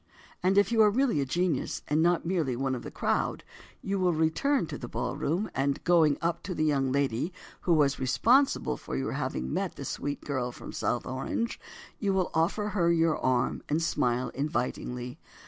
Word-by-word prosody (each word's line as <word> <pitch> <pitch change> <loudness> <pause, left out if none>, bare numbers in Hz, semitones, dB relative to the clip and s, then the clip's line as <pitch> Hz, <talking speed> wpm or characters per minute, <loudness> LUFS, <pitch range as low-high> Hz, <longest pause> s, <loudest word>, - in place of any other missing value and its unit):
And, 190 +2 +2
if 205 +3 +4
you 225 -1 +4
are 210 - +7
really 235 - +2
a 135 - -2
genius, 170 -1 -1
and 150 +2 +2
not 170 0 +2
merely 165 -8 0
"one 135 +1 -1
of 125 - -3
the - - -7
crowd" - - -1 0.4
you 195 0 -1
will 180 -2 +2
return 165 - +1
to - - -6
the 120 - -6
ballroom 155 - -2
and, 140 +1 -1
going 165 -5 +4
up 170 0 0
to 180 -1 -5
the 155 - 0
young 135 -3 +1
lady 140 +3 0 0.3
who 175 - +2
was 145 -2 +2
responsible 245 - +3
for - - -6
your 65 - -2
having 65 +1 -3
met - - -2
the - - -7
sweet 145 0 -3
girl 130 -4 -2
from - - -9
South - - -1
Orange, 135 - -3 0.4
you 200 -3 +1
will 185 -2 0
offer 200 +6 +1
her 175 -5 +2
your 165 -1 +2
arm, 130 0 +1
and 150 - +2
smile 125 -4 0
invitingly. 125 -2 -3
155 Hz, 190 wpm, -29 LUFS, 130-185 Hz, 0.4 s, are